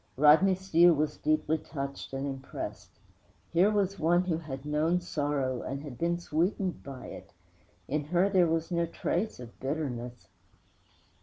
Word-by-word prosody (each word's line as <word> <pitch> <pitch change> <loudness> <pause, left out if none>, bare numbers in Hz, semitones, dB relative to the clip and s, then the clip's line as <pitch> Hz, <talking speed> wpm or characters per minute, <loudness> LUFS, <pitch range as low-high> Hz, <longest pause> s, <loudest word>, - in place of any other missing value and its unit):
Rodney 155 +7 +6
Steele 175 -2 +5
was 150 +1 -1
deeply 155 +1 +1
touched 140 -2 -6
and 135 +1 -3
impressed. 135 -1 -6 0.6
Here 180 +5 +5
was 200 -2 0
one 175 +3 +3
who 170 -3 -1
had 135 -4 -7
known 155 +4 +1
sorrow 145 -7 -1
and 140 +2 -5
had 130 -5 -9
been 170 +1 +1
sweetened 175 +3 -1
by 135 -2 -9
it. - - -10 0.5
In 150 +1 -1
her 175 +5 +2
there 185 -3 +4
was 165 +1 -1
no 170 -1 +1
trace 175 - -2
of 120 -2 -11
bitterness. 125 -4 -4
155 Hz, 150 wpm, -30 LUFS, 140-175 Hz, 0.6 s, Rodney